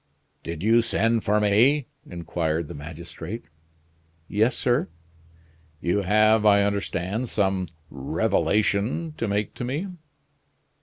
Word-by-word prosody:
"Did 85 0 -6
you 115 +2 +5
send 115 0 +1
for 105 +1 +2
me?" 120 +8 +4 0.2
inquired 85 -2 -2
the - - -8
magistrate. 80 +7 -8 0.8
"Yes, 110 +5 +2
sir." 120 -6 +1 0.9
"You 90 +5 0
have, 110 +2 +4
I 100 -1 +5
understand, 100 +3 -2
some 95 -3 0 0.2
revelation 105 - 0
to 115 - -2
make 105 +1 -1
to - - -6
me." 145 +10 -3
105 Hz, 110 wpm, -25 LUFS, 90-115 Hz, 0.9 s, you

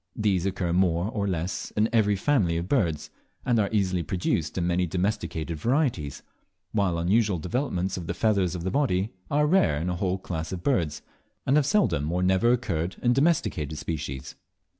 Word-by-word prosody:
These 100 -4 +1
occur 90 -3 -1
more, 90 +2 +2
or 100 -3 -1
less 90 +1 -2
in 105 +1 +4
every 105 -3 +3
family 100 - +1
of 85 +1 -3
birds, 85 - 0 0.3
and 120 -2 +2
are 100 -2 +1
easily 95 -4 +1
produced 85 -1 -1
in 85 - 0
many 90 +1 +1
domesticated 85 -3 -2
varieties, 120 - 0 0.5
while 100 -5 +1
unusual 100 +3 +2
developments 90 - -2
of 85 -2 -6
the 85 - -2
feathers 100 -5 +1
of 85 - -5
the 95 - -1
body 110 -8 +1 0.2
are 150 +1 +2
rare 150 - +3
in 80 - -3
the 90 -1 -1
whole 95 0 0
class 80 -4 -5
of 90 -2 -5
birds, 85 - 0 0.4
and 135 - +3
have 150 -2 +3
seldom 85 - +2
or 90 +1 0
never 95 +6 +3
occurred 95 -9 -1
in 120 0 +4
domesticated 125 - +1
species. 75 -4 -5
95 Hz, 180 wpm, -26 LUFS, 85-110 Hz, 0.5 s, in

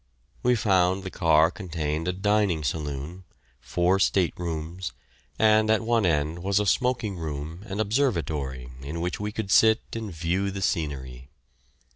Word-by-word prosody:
We 125 0 +3
found 95 -3 +2
the 95 - -6
car 80 -2 +4
contained 80 -4 -3
a - - +2
dining 95 -3 +1
saloon, 75 +4 -4 0.4
four 90 +8 +1
state 95 -2 +2
rooms, 85 +1 -4 0.4
and 110 0 +4
at 110 0 +3
one 115 -3 +2
end 75 +1 0
was 100 +2 +1
a 105 - 0
smoking 120 -3 +1
room 80 +2 -5
and 100 +1 -4
observatory 80 - -1
in 75 +5 -5
which 90 +1 -2
we 105 0 -3
could 105 -2 -4
sit 110 0 +5
and 110 -3 -4
view 90 +4 -1
the 95 0 -4
scenery. 65 -6 -3
90 Hz, 150 wpm, -26 LUFS, 80-105 Hz, 0.4 s, sit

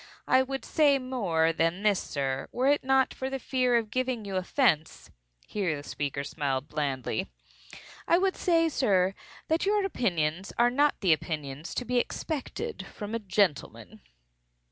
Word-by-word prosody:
I 260 - +5
would 270 +1 -4
say 290 -3 +4
more 200 -12 0
than 165 +4 0
this, 205 -3 +3
sir, 135 -2 -3
were 255 - -1
it 290 - +2
not 265 0 +3
for 265 - -4
the 270 - -2
fear 255 -1 +1
of 220 -2 -2
giving 255 -3 -1
you 195 -1 -4
offence 185 - 0 0.3
(here 185 -7 -1
the 145 - -11
speaker 140 -1 -3
smiled 140 -2 -2
blandly), 140 -5 -2 0.8
I 340 - +5
would 380 +1 +1
say, 330 -2 +2
sir, 195 - +2 0.3
that 325 +5 +1
your 410 -1 +2
opinions 180 - -1
are 240 +1 +4
not 290 +3 +2
the 185 -5 +5
opinions 150 -1 -5
to 250 - -2
be 250 +1 +2
expected 260 - -4
from 210 +1 -7
a 230 - 0
gentleman." 190 -6 -1
210 Hz, 160 wpm, -28 LUFS, 160-265 Hz, 0.8 s, I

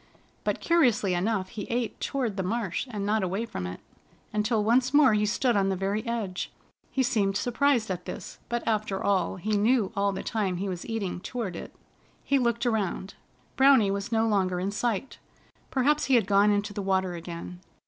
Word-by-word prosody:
But - - -1
curiously 245 - +3
enough 185 +1 0
he 215 -4 -6
ate 235 -1 -2
toward 250 -7 -2
the 195 - -1
marsh, 210 +3 -2
and 205 -4 -3
not 215 +1 +1
away 190 +5 -1
from 90 - -5
it, 90 - -7 0.5
until 210 +1 +1
once 250 +5 +3
more 285 -6 +6
he 210 0 +2
stood 235 +3 +1
on 195 -1 +2
the 190 - 0
very 195 +3 -1
edge. 215 -6 -3 0.4
He 265 - +1
seemed 205 -6 +1
surprised 245 -3 +1
at 180 -1 -4
this, - - -7
but 240 0 -2
after 215 -3 0
all 200 -2 +1
he 190 +4 -4
knew 215 0 +2
all 200 0 +2
the 190 - -5
time 195 -5 -1
he 195 +3 -3
was 180 -2 -5
eating 215 -6 -3
toward 210 -3 -4
it. - - -8 0.5
He 275 - +2
looked 235 -1 0
around. 205 -4 -1 0.4
Browny 265 -7 +5
was 200 +2 -3
no 225 0 +2
longer 190 -4 +1
in 190 +2 -1
sight. 230 +3 -2 0.5
Perhaps 290 +3 +2
he 270 - +3
had 230 -5 +4
gone 200 +1 +4
into 205 0 0
the 205 - -3
water 190 -1 0
again. 170 +1 -7
210 Hz, 190 wpm, -27 LUFS, 195-235 Hz, 0.5 s, more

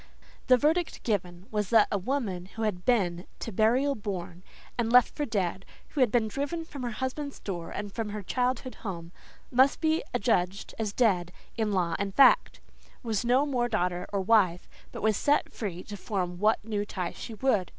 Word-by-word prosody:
The 255 - +7
verdict 320 +6 0
given 180 -5 -2
was 210 -2 -1
that 225 -3 +6
a 205 - +2
woman 195 -6 -2
who 225 +3 -6
had 180 -5 -2
been 180 -8 +1
"to 230 - -6
burial 240 +8 +3
borne" 185 -6 -5 0.3
and 230 -1 0
left 250 0 +6
for 295 - -1
dead, 195 -5 -1 0.3
who 295 - -5
had 250 -5 +4
been 230 -2 +2
driven 290 +8 -3
from 285 -4 -8
her 245 - -2
husband's 260 +5 -4
door 175 -4 -5
and 205 -1 -5
from 225 -2 -3
her 210 0 -5
childhood 255 +4 -1
home, 170 -5 -6 0.4
"must 260 +3 +4
be 320 0 +2
adjudged 195 -4 0
as 215 -2 -1
dead 190 -7 +2 0.2
in 220 -2 0
law 175 -4 +1
and 200 -1 -3
fact," 275 - +5 0.4
was 220 -3 -1
no 250 +4 +3
more 250 -4 0
daughter 180 -2 -1
or 200 -1 0
wife, 190 -4 +3 0.2
but - - -7
was 215 -1 +3
set 290 +7 +1
free 185 -5 -5
to 210 - -8
form 180 -3 -3
what 210 +1 +2
new 210 -2 -1
ties 185 -4 -4
she 225 - -7
would. 210 -6 +1
215 Hz, 190 wpm, -28 LUFS, 185-250 Hz, 0.4 s, The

